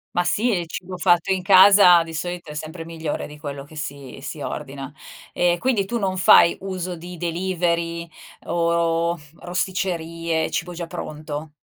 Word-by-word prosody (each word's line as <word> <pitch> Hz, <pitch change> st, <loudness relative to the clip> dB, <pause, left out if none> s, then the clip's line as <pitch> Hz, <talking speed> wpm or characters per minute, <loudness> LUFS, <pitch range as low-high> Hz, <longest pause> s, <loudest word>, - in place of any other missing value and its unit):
Ma 175 Hz, -, +3 dB
sì, 230 Hz, +7 st, +1 dB
e 180 Hz, -, +1 dB
il 170 Hz, -, -7 dB
cibo 185 Hz, +1 st, -6 dB
fatto 175 Hz, 0 st, +2 dB
in 185 Hz, -, -2 dB
casa 190 Hz, -2 st, +8 dB
di 165 Hz, 0 st, -9 dB
solito 175 Hz, 0 st, -5 dB
è -, -, -7 dB
sempre 160 Hz, +2 st, -7 dB
migliore 160 Hz, -2 st, -4 dB
di 150 Hz, 0 st, -12 dB
quello 140 Hz, -2 st, -7 dB
che 155 Hz, -, -16 dB
si 140 Hz, -3 st, -7 dB
si 140 Hz, +3 st, -6 dB
ordina. 140 Hz, -1 st, -6 dB, 0.4 s
Ehm, 175 Hz, 0 st, +2 dB
quindi 220 Hz, 0 st, +1 dB
tu 235 Hz, +4 st, -3 dB
non 190 Hz, -2 st, -1 dB
fai 175 Hz, -2 st, +6 dB
uso 185 Hz, -2 st, -4 dB
di 175 Hz, +1 st, -9 dB
delivery 170 Hz, -1 st, -1 dB, 0.4 s
o 170 Hz, 0 st, +1 dB, 0.2 s
rosticcerie, 170 Hz, -3 st, -2 dB
cibo 180 Hz, +2 st, -2 dB
già 170 Hz, 0 st, -5 dB
pronto? 155 Hz, -2 st, -6 dB
170 Hz, 165 wpm, -22 LUFS, 160-180 Hz, 0.4 s, casa